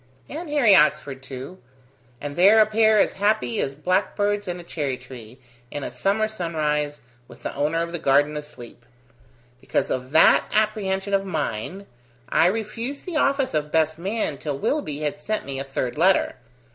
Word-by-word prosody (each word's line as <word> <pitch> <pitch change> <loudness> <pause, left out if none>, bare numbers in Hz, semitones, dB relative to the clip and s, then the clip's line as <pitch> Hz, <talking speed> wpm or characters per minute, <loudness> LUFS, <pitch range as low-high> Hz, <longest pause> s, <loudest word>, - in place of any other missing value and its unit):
"And 320 +3 -7
Harry 280 -8 +4
Oxford 150 -4 +2
too. 135 +7 -9 0.6
And 145 0 -6
they're 195 +5 +6
a 215 - +7
pair 220 0 +3
as - - +3
happy 205 - +1
as 135 0 -3
blackbirds 205 +5 0
in 180 0 -4
a - - -9
cherry 145 -6 -3
tree, 125 -2 -12 0.3
in 145 - -5
a - - -5
summer 210 +3 0
sunrise, 150 -7 -2 0.3
with - - -16
the - - -4
owner 155 +4 0
of 170 - -6
the 175 - -4
garden 145 0 +3
asleep. 150 -5 -9 0.8
Because - - -1
of 130 0 -3
that 160 +3 +5
apprehension 205 -2 0
of 195 0 +2
mine, 160 - -4 0.4
I 165 - +4
refused 225 +7 -3
the 350 -4 -3
office 275 -2 +1
of 150 -1 -1
best 160 0 +1
man 190 -6 -2
till 145 -2 -3
Willoughby 150 - -2
had 150 0 -3
sent 215 +6 -2
me 135 -1 -4
a - - -2
third 135 0 -4
letter. 190 +3 +3
165 Hz, 170 wpm, -23 LUFS, 145-210 Hz, 0.8 s, a